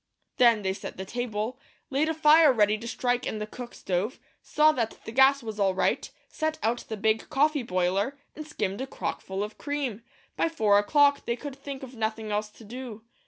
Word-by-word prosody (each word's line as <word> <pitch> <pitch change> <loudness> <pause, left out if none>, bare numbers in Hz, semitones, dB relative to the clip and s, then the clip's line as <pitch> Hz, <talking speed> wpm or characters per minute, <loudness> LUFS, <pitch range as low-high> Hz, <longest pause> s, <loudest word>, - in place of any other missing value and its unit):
Then 235 -4 +5
they 190 0 0
set 195 - -8
the 190 - -5
table, 235 +2 -3 0.3
laid 290 +4 +1
a 320 - -1
fire 310 -1 +7
ready 210 -3 +3
to 230 +2 -7
strike 245 0 -1
in - - -3
the 210 - -3
cook 240 +3 -9
stove, 195 +7 -2 0.2
saw 305 +1 +4
that 235 -7 -2
the - - -6
gas 265 +2 +5
was 220 -2 -6
all 195 -2 +2
right, 190 - 0 0.2
set 315 -1 -2
out 230 +2 +1
the 220 - -4
big 220 +2 0
coffee 300 0 +2
boiler, 195 +5 0 0.2
and 310 0 -8
skimmed 205 -6 -3
a 265 - -3
crock - - -4
full 190 +1 -4
of 210 +1 -7
cream. 285 -7 -3 0.3
By 330 - +1
four 210 -11 +3
o'clock, 285 +6 +3
they 235 - 0
could 285 +1 -7
think 275 -1 -8
of 260 -1 -9
nothing 220 -1 -3
else 210 +1 -1
to 220 - -16
do. 235 -1 -8
235 Hz, 210 wpm, -27 LUFS, 210-275 Hz, 0.3 s, fire